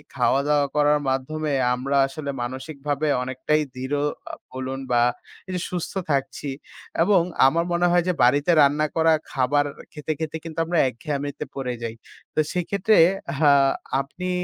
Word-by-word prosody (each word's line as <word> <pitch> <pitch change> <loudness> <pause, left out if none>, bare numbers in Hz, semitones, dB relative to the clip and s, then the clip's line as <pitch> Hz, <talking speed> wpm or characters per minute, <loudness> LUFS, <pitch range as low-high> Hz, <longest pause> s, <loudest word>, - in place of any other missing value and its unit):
খাওয়া-দাওয়া 145 +1 +2
করার 150 0 +4
মাধ্যমে 150 +4 -2 0.2
আমরা 135 +3 -1
আসলে 140 +1 -6
মানসিকভাবে 140 +4 -3 0.2
অনেকটাই 130 +4 0
দৃঢ় 130 +3 -3 0.6
বলুন 130 +1 -4
বা 120 -1 +4 0.5
এই - - -6
যে 175 - -2
সুস্থ 180 -2 -3 0.2
থাকছি 140 +1 -2 0.5
এবং 190 -1 +4 0.3
আমার 170 +5 +1
মনে 175 +1 +3
হয় 175 0 +4
যে 180 - +2
বাড়িতে 145 +7 +4
রান্না 150 +2 +3
করা 160 0 +4 0.2
খাবার 140 +2 +2 0.3
খেতে, 150 +1 -4
খেতে 160 0 -3
কিন্তু 165 -1 -6
আমরা 170 +1 -1
একঘেয়ামিতে 145 +3 -4
পড়ে 130 -2 -3
যাই। 115 -1 -4 0.4
তো - - +1
সেক্ষেত্রে 200 +4 +1 0.4
আ 145 0 +4 0.5
আপনি 180 +7 -6
145 Hz, 140 wpm, -23 LUFS, 135-160 Hz, 0.6 s, করার